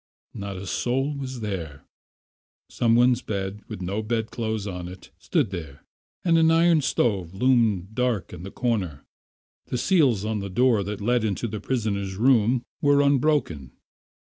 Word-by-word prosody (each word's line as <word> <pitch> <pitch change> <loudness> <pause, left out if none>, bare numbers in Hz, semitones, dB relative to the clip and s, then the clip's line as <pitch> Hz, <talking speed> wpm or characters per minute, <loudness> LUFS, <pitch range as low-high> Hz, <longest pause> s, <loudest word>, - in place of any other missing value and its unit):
Not 100 -1 -6
a 95 - -7
soul 135 - -1
was 130 -3 -6
there. 85 -9 -5 0.8
Some 115 -1 +1
one's 125 0 +4
bed, 100 0 -4
with 90 - -7
no 100 +4 -2
bedclothes 110 -1 -2
on 90 -3 -5
it, 90 +1 -12
stood - - 0
there, 80 -7 -7 0.4
and 165 -2 +4
an 160 0 +5
iron 165 -1 +4
stove 95 - 0
loomed 110 -5 +2
dark 120 -7 -1
in 90 - -8
the 95 - -7
corner. 100 - -2 0.6
The 125 - -2
seals 125 - +2
on 110 -1 -1
the 100 0 -5
door 120 +2 +3
that 100 +1 -5
led 120 +2 +1
into 110 +2 -1
the 105 -1 -5
prisoner's 100 -6 -2
room 120 +1 +3 0.2
were 145 0 +4
unbroken. 140 - +1
110 Hz, 155 wpm, -25 LUFS, 95-125 Hz, 0.8 s, an